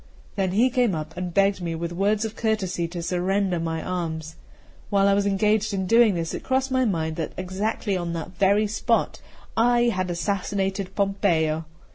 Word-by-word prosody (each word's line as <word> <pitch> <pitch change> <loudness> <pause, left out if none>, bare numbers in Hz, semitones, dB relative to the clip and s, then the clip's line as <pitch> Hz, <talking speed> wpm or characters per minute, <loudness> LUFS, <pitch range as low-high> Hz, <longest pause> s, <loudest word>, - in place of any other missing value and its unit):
Then 190 -2 0
he 240 +6 +3
came 240 -7 +2
up, 155 +1 -6
and 180 0 -4
begged 195 +1 +2
me 170 -1 -3
with 170 +1 -4
words 205 +4 +1
of 220 0 -5
courtesy 200 -7 -1
to 170 0 -6
surrender 185 +1 0
my 165 -1 -3
arms. 165 -3 -4 0.5
While 200 -1 +3
I 200 - +4
was 200 0 +2
engaged 210 +1 +1
in 190 -1 -1
doing 230 0 +5
this, 165 -1 -3
it - - -4
crossed 265 0 0
my 260 -1 +2
mind 160 -6 -1
that 160 - -3
exactly 195 +2 -2
on 175 -2 -2
that 165 +1 -5
very 200 +3 +3
spot 215 +1 0 0.3
I 240 +1 +4
had 185 -1 -2
assassinated 195 +1 -2
Pompeo. 170 -6 +1
195 Hz, 180 wpm, -24 LUFS, 170-210 Hz, 0.5 s, doing